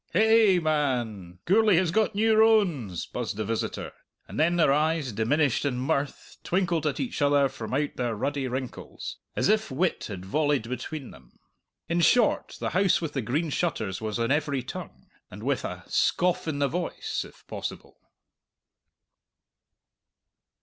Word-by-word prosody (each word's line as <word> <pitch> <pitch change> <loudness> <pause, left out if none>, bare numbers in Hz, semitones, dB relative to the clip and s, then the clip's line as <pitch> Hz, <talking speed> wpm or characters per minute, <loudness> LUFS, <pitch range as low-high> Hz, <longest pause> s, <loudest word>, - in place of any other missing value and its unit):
"Ha 175 - +3
ay, 220 -3 +5
man, 120 - -1
Gourlay 210 +1 +5
has 175 -1 +2
got 220 +2 +1
new 220 +1 +3
rones!" 185 - +3
buzzed - - -4
the 110 - -2
visitor; 115 +1 -3 0.4
and - - -6
then 170 +3 +3
their 155 -5 +4
eyes, 155 -2 +1
diminished 125 +6 +1
in 140 -4 -1
mirth, 140 +2 -2
twinkled 170 -4 0
at 145 - -2
each 240 - -3
other 145 -1 +4
from 120 -4 -7
out 145 +1 -1
their 120 -3 -1
ruddy 140 +4 -2
wrinkles, 130 0 -6 0.2
as - - +1
if 215 +1 +2
wit 165 +7 0
had 95 -3 -7
volleyed 145 +2 +1
between 130 +3 -5
them. 65 -3 -18 0.5
In 170 +1 +1
short, 240 +5 +3
the - - -2
House 190 0 +3
with 160 -3 -4
the 135 - -1
Green 145 +8 -1
Shutters 110 - -2
was 110 0 -2
on 115 +2 0
every 145 -3 0
tongue 65 - -8 0.2
and - - -10
with - - 0
a - - -5
scoff 180 -1 +1
in 155 -3 -1
the 140 0 +2
voice, 175 +5 -3
if - - -16
possible. - - -7
145 Hz, 160 wpm, -27 LUFS, 125-175 Hz, 0.5 s, ay